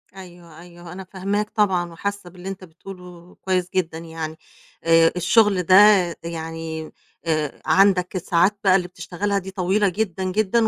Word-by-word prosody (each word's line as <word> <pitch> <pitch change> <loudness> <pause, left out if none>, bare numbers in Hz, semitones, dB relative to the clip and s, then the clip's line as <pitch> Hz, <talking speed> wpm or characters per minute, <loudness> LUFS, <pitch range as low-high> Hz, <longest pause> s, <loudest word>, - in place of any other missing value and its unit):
أيوه، 175 -3 -13
أيوه. 175 -1 -13
أنا 190 +1 -8
فاهماك 200 +3 -3
طبعًا 185 -6 0
وحاسّة 200 +2 -5
باللي 180 +2 -9
أنت 195 -1 -8
بتقوله 180 0 -13
كويس 185 -1 -1
جدًا 165 -3 -1
يعني. 160 -1 -7 0.5
آآ، 165 0 +5
الشُغل 195 +1 +3
ده 185 +2 +4 0.5
يعني 165 -1 -6 0.3
آآ 155 -3 -2
عندك 190 -1 +3
الساعات 180 +3 +1
بقى 190 -2 +5
اللي 180 -2 0
بتشتغلها 180 +3 -3
دي 190 0 -9
طويلة 195 +2 +1
جدًا، 190 -1 -3
جدًا 215 +4 +1
180 Hz, 145 wpm, -22 LUFS, 170-195 Hz, 0.5 s, آآ